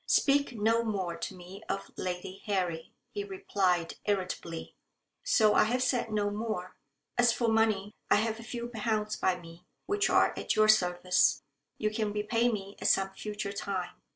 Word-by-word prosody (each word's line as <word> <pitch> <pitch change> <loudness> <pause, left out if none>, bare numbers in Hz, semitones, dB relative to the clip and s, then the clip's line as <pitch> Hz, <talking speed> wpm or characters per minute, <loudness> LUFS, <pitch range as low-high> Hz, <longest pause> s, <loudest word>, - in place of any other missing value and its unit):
'Speak 280 -2 +3
no 225 +2 +3
more 190 -6 -2
to 190 - -5
me 185 +3 -11
of 195 0 -3
Lady 185 +1 -5
Harry,' 180 -5 -1 0.2
he 410 - -3
replied 200 - 0
irritably. 185 -4 -3 0.5
So 220 - +4
I - - +5
have 250 +3 +1
said 245 -3 0
no 205 -1 0
more. 205 -4 -4 0.4
As 240 -1 +6
for 235 0 0
money, 220 -2 +2 0.2
I - - +6
have 220 +1 0
a - - -8
few 235 0 -5
pounds 215 -2 -1
by 185 -1 +1
me, 165 0 -13 0.2
which 410 +1 +1
are - - +4
at - - -1
your 215 0 +5
service. 180 -3 +3 0.3
You 215 0 0
can 215 -1 -1
repay 230 +3 +1
me 200 -2 -5
at - - +1
some 195 0 +3
future 205 +1 -5
time. 190 -3 -3
210 Hz, 170 wpm, -30 LUFS, 185-225 Hz, 0.5 s, As